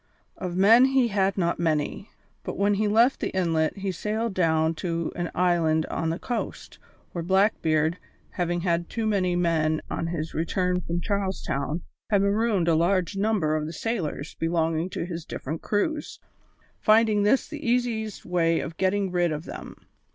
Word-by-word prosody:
Of 180 Hz, -1 st, -4 dB
men 225 Hz, +6 st, +7 dB
he 265 Hz, -2 st, +3 dB
had 195 Hz, -1 st, +1 dB
not 170 Hz, -3 st, 0 dB
many, 160 Hz, +4 st, -1 dB, 0.3 s
but -, -, -5 dB
when 205 Hz, +1 st, +3 dB
he 210 Hz, +1 st, +1 dB
left 230 Hz, +5 st, +4 dB
the -, -, -1 dB
inlet 165 Hz, -2 st, +1 dB
he 195 Hz, -1 st, -2 dB
sailed 215 Hz, +3 st, -2 dB
down 160 Hz, -3 st, +2 dB
to 170 Hz, -2 st, -2 dB
an 175 Hz, -1 st, -2 dB
island 165 Hz, -3 st, +2 dB
on 165 Hz, -, -1 dB
the 165 Hz, -, -1 dB
coast, 240 Hz, +4 st, -5 dB, 0.3 s
where 170 Hz, -, -4 dB
Blackbeard, 170 Hz, -4 st, +2 dB, 0.3 s
having 175 Hz, -1 st, -1 dB
had 170 Hz, -1 st, 0 dB
too 225 Hz, -1 st, -2 dB
many 190 Hz, -4 st, +1 dB
men 160 Hz, -3 st, +1 dB
on 165 Hz, -, -2 dB
his 165 Hz, -1 st, -4 dB
return 180 Hz, +3 st, 0 dB
from 170 Hz, 0 st, -3 dB
Charles 200 Hz, -1 st, -2 dB
Town, 150 Hz, +5 st, -2 dB, 0.3 s
had 200 Hz, -2 st, +3 dB
marooned 200 Hz, -3 st, +1 dB
a 165 Hz, -, +4 dB
large 175 Hz, +2 st, +1 dB
number 195 Hz, -7 st, +1 dB
of 155 Hz, -1 st, -2 dB
the 160 Hz, -, -6 dB
sailors 165 Hz, -8 st, -3 dB
belonging 165 Hz, +1 st, 0 dB
to 170 Hz, -, -4 dB
his 170 Hz, -2 st, -5 dB
different 155 Hz, +1 st, -5 dB
crews, 295 Hz, +9 st, -2 dB, 0.6 s
finding 215 Hz, -1 st, +4 dB
this 210 Hz, +6 st, +3 dB
the 305 Hz, -1 st, -8 dB
easiest 235 Hz, -3 st, -1 dB
way 165 Hz, -2 st, +2 dB
of 165 Hz, -, -6 dB
getting 190 Hz, 0 st, +1 dB
rid 175 Hz, -2 st, +1 dB
of 155 Hz, +2 st, -4 dB
them. -, -, -8 dB
180 Hz, 170 wpm, -26 LUFS, 165-205 Hz, 0.6 s, men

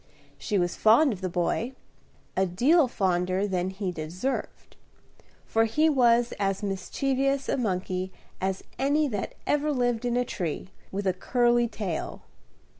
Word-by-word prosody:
She 210 Hz, -, -1 dB
was 175 Hz, -1 st, 0 dB
fond 235 Hz, +5 st, +5 dB
of 190 Hz, -, -9 dB
the 185 Hz, -, -1 dB
boy, 180 Hz, +8 st, -1 dB, 0.6 s
a 190 Hz, 0 st, +2 dB
deal 265 Hz, -, +4 dB
fonder 185 Hz, -2 st, 0 dB
than 185 Hz, -1 st, -1 dB
he 190 Hz, -1 st, -3 dB
deserved, 175 Hz, +11 st, -4 dB, 0.7 s
for 225 Hz, 0 st, +2 dB
he 305 Hz, +9 st, +3 dB
was 240 Hz, -4 st, +3 dB
as 195 Hz, 0 st, 0 dB
mischievous 270 Hz, +7 st, -1 dB
a -, -, +1 dB
monkey 185 Hz, -5 st, -2 dB, 0.3 s
as 190 Hz, 0 st, -1 dB, 0.2 s
any 290 Hz, +3 st, +2 dB
that 205 Hz, -5 st, -4 dB
ever 295 Hz, +1 st, +1 dB
lived 245 Hz, -3 st, 0 dB
in 245 Hz, 0 st, 0 dB
a 250 Hz, -, +1 dB
tree, 180 Hz, -3 st, -4 dB, 0.2 s
with 200 Hz, +1 st, -3 dB
a 190 Hz, -, +2 dB
curly 240 Hz, +5 st, +2 dB
tail. 195 Hz, -8 st, -4 dB
215 Hz, 145 wpm, -27 LUFS, 185-255 Hz, 0.7 s, fond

